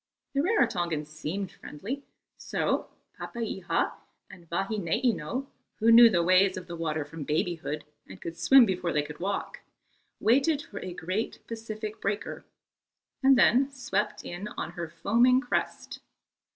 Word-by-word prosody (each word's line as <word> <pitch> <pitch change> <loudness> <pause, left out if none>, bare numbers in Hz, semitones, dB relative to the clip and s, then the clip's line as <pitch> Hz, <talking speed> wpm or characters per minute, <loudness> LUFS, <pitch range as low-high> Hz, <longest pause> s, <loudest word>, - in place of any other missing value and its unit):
The 275 - +2
Rarotongans 175 - +1
seemed 170 +5 -4
friendly; 215 - -6 0.3
so - - -1 0.3
Papeiha 215 -6 -2 0.4
and 170 -2 -15
Vahineino, 210 - -1 0.3
who 230 +1 +4
knew 235 0 +10
the 175 -5 +2
ways 185 +2 +4
of 185 - -6
the 175 -1 -7
water 155 -2 -2
from 155 +1 -7
babyhood 155 0 -2 0.2
and 95 - -11
could 165 - -6
swim 235 +10 +7
before 180 -3 -1
they 150 - +2
could 150 0 -9
walk, 195 +3 -3 0.6
waited 280 +6 +3
for 200 - -8
a 185 - -6
great 185 +7 -3
Pacific 220 -1 -6
breaker, 200 +1 -3 0.8
and 270 -1 +6
then 260 +2 +5
swept 230 -7 -2
in 175 +4 -5
on 160 - -3
her 170 -2 -5
foaming 235 +10 +3
crest. 250 -2 -3
195 Hz, 140 wpm, -28 LUFS, 170-230 Hz, 0.8 s, knew